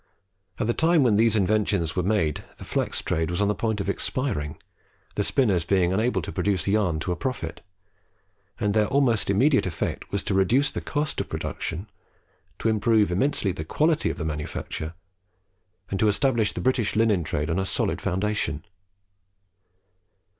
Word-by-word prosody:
At -, -, -1 dB
the 120 Hz, -, +1 dB
time 160 Hz, 0 st, +3 dB
when 115 Hz, -5 st, +4 dB
these 110 Hz, +1 st, +4 dB
inventions 100 Hz, -5 st, +1 dB
were 90 Hz, -, +1 dB
made 90 Hz, -5 st, 0 dB
the -, -, -10 dB
flax -, -, -2 dB
trade 80 Hz, 0 st, 0 dB
was 85 Hz, -, -2 dB
on 100 Hz, 0 st, +2 dB
the -, -, +2 dB
point 110 Hz, -1 st, -1 dB
of 100 Hz, -, -3 dB
expiring, 100 Hz, -, -2 dB, 0.6 s
the -, -, 0 dB
spinners 100 Hz, -, +2 dB
being 90 Hz, 0 st, +2 dB
unable 110 Hz, +5 st, +1 dB
to -, -, -5 dB
produce 95 Hz, -2 st, 0 dB
yarn 100 Hz, -6 st, +2 dB
to 90 Hz, -, -2 dB
a -, -, 0 dB
profit; 105 Hz, -, -4 dB, 1.0 s
and 105 Hz, -1 st, +1 dB
their 105 Hz, -1 st, +3 dB
almost 135 Hz, -7 st, +2 dB
immediate 130 Hz, +5 st, +3 dB
effect 85 Hz, -, -4 dB
was 100 Hz, -, -1 dB
to 105 Hz, -, -1 dB
reduce 120 Hz, +10 st, +3 dB
the -, -, -4 dB
cost 150 Hz, 0 st, -2 dB
of -, -, -7 dB
production, 90 Hz, +6 st, -4 dB, 0.7 s
to -, -, -2 dB
improve 110 Hz, -2 st, +3 dB
immensely 100 Hz, 0 st, +1 dB
the 80 Hz, -, -5 dB
quality 155 Hz, -, +1 dB
of -, -, -4 dB
the 80 Hz, -, -3 dB
manufacture, 80 Hz, +1 st, -4 dB, 1.0 s
and 95 Hz, -, -1 dB
to 110 Hz, -, +3 dB
establish 115 Hz, 0 st, +2 dB
the -, -, -4 dB
British 125 Hz, -5 st, +1 dB
linen 105 Hz, -5 st, +3 dB
trade 75 Hz, -1 st, -2 dB
on 85 Hz, -, 0 dB
a -, -, +1 dB
solid -, -, 0 dB
foundation. 95 Hz, -4 st, -1 dB
105 Hz, 170 wpm, -25 LUFS, 90-115 Hz, 1.0 s, when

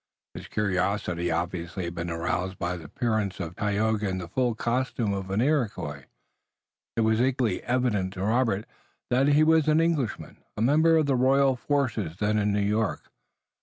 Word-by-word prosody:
His -, -, -9 dB
curiosity 95 Hz, -3 st, -1 dB
obviously 85 Hz, +2 st, -3 dB
had 85 Hz, 0 st, -4 dB
been 85 Hz, 0 st, -4 dB
aroused 90 Hz, +2 st, -2 dB
by 90 Hz, +1 st, -2 dB
the 85 Hz, -3 st, -9 dB
appearance 110 Hz, +2 st, -2 dB
of 85 Hz, -1 st, -5 dB
Tayoga 105 Hz, 0 st, 0 dB
in 95 Hz, -, -2 dB
the 90 Hz, -2 st, -5 dB
full 120 Hz, +5 st, 0 dB
costume 120 Hz, -2 st, -1 dB
of 95 Hz, -1 st, -4 dB
an 100 Hz, +3 st, 0 dB
Iroquois. 115 Hz, -, -1 dB, 0.9 s
It 115 Hz, -, +1 dB
was 110 Hz, +1 st, +2 dB
equally 125 Hz, -6 st, +1 dB
evident 115 Hz, -7 st, 0 dB
to 95 Hz, -, -5 dB
Robert 110 Hz, -1 st, +1 dB, 0.5 s
that 130 Hz, +3 st, +3 dB
he 145 Hz, +1 st, +5 dB
was 160 Hz, -1 st, +4 dB
an 155 Hz, +1 st, +4 dB
Englishman, 160 Hz, -9 st, -1 dB, 0.2 s
a -, -, -2 dB
member 160 Hz, +6 st, +4 dB
of 155 Hz, -, +3 dB
the 140 Hz, -2 st, +1 dB
royal 135 Hz, +1 st, +3 dB
forces 120 Hz, -, -1 dB
then 105 Hz, +1 st, +1 dB
in 105 Hz, 0 st, +1 dB
New 100 Hz, 0 st, +1 dB
York. 105 Hz, +1 st, -1 dB
105 Hz, 170 wpm, -26 LUFS, 95-130 Hz, 0.9 s, he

